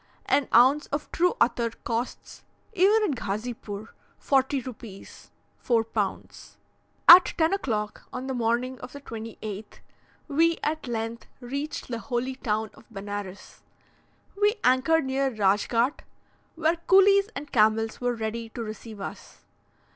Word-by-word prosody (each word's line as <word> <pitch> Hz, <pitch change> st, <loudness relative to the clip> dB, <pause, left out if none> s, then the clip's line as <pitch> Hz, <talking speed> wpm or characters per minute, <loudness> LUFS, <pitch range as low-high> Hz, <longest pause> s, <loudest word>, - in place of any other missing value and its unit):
An 285 Hz, -, +2 dB
ounce 265 Hz, +5 st, +5 dB
of 290 Hz, +1 st, -4 dB
true 360 Hz, +1 st, +2 dB
attar 235 Hz, -1 st, +2 dB
costs, 235 Hz, +2 st, -4 dB, 0.3 s
even 415 Hz, +3 st, +4 dB
at -, -, -2 dB
Ghazipoor, 215 Hz, 0 st, -5 dB, 0.3 s
40 270 Hz, 0 st, +1 dB
rupees 230 Hz, -5 st, -11 dB, 0.3 s
(4 230 Hz, -2 st, +2 dB
pounds). 225 Hz, -, -5 dB, 0.5 s
At 355 Hz, +1 st, +9 dB
10 325 Hz, +2 st, +2 dB
o'clock 215 Hz, -, -3 dB
on 255 Hz, +1 st, -5 dB
the 265 Hz, -, -3 dB
morning 245 Hz, +2 st, -1 dB
of 250 Hz, -, -10 dB
the 285 Hz, -, -9 dB
28th, 220 Hz, -3 st, -8 dB, 0.5 s
we 330 Hz, +3 st, +2 dB
at 310 Hz, -2 st, -2 dB
length 230 Hz, 0 st, -4 dB
reached 280 Hz, +4 st, -5 dB
the 235 Hz, -2 st, -3 dB
holy 250 Hz, +1 st, -2 dB
town 220 Hz, -4 st, -2 dB
of -, -, -19 dB
Benares. 205 Hz, -2 st, -7 dB, 0.7 s
We 415 Hz, +2 st, +2 dB
anchored 270 Hz, +5 st, +3 dB
near 270 Hz, +1 st, 0 dB
Radschgaht, 225 Hz, +4 st, +1 dB, 0.6 s
where 325 Hz, +1 st, +1 dB
coolies 395 Hz, +1 st, +6 dB
and 290 Hz, 0 st, -7 dB
camels 220 Hz, 0 st, +2 dB
were 245 Hz, 0 st, 0 dB
ready 225 Hz, +1 st, -4 dB
to 230 Hz, +1 st, -6 dB
receive 215 Hz, 0 st, -8 dB
us. 195 Hz, -, -9 dB
245 Hz, 130 wpm, -26 LUFS, 220-285 Hz, 0.7 s, At